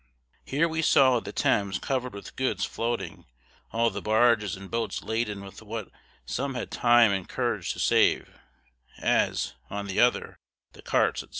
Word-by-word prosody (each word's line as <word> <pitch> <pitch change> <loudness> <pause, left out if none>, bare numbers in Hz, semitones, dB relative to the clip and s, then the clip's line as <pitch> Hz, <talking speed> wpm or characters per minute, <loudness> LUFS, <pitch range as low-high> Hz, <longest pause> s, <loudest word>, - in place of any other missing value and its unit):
Here 150 +5 +1
we 160 0 -2
saw 130 -5 +5
the 110 - -8
Thames 100 -1 +1
covered 130 -2 -2
with 100 - -10
goods 130 0 0
floating, 115 -7 -4 0.4
all 115 0 +2
the 100 - -5
barges 110 -2 +3
and 95 0 -11
boats 115 -1 -2
laden 110 -3 -2
with 95 - -11
what 110 -1 -6 0.3
some 135 +1 -3
had 125 - -5
time 120 -2 +5
and 95 -2 -3
courage - - -1
to - - -10
save, - - +3 0.7
as, - - +1 0.2
on 100 0 -4
the 95 -1 -2
other, 120 0 +2 0.3
the - - -15
carts, - - +1
&c. - - -14
115 Hz, 165 wpm, -27 LUFS, 100-125 Hz, 0.7 s, saw